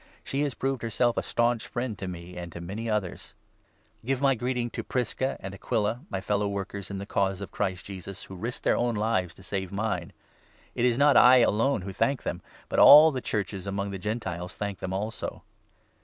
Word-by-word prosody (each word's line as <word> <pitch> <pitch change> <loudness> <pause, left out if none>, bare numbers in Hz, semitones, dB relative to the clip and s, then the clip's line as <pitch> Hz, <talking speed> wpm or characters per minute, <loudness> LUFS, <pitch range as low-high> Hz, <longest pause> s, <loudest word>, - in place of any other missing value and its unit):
She 140 - -2
has 145 -4 -1
proved 135 -1 -2
herself 115 +1 +1
a - - 0
staunch 120 -1 0
friend 120 -2 -3
to 95 - -4
me 90 0 -8
and 85 -1 -7
to - - -7
many 100 +7 -5
others. 105 -4 -3 0.7
Personal 115 - -19
Give 135 0 0
my 135 -1 +5
greeting 125 0 -2
to - - -4
Prisca 130 +1 -1
and 95 0 -7
Aquila, 105 +2 0
my 115 - -2
3 125 - -17
Greetings, 95 - -7
fellow 105 0 +1
workers 100 0 -5
in 100 - -4
the 100 - -5
Cause 95 -2 0
of 100 - -7
Christ 95 -3 -2
Jesus, 95 -1 -8
who 95 - -10
risked 115 +7 -5
their - - +3
own 120 -1 0
lives 105 -5 0
to 95 - -15
save 95 0 -3
mine. 100 -4 -2 0.6
It 120 - 0
is 120 -1 +3
not 145 0 +5
I 125 0 +8
4 - - +4
alone 115 +2 +1
who 95 0 -6
thank 135 +6 0
them, 85 +1 -3 0.3
but - - 0
all 155 +2 +10
the 130 -3 -3
Churches 100 -3 -3
among 100 0 -2
the 95 - -5
Gentiles 90 -4 -4
thank 100 -2 -4
them 95 - -4
also. 105 +4 -4
105 Hz, 220 wpm, -27 LUFS, 95-120 Hz, 0.7 s, all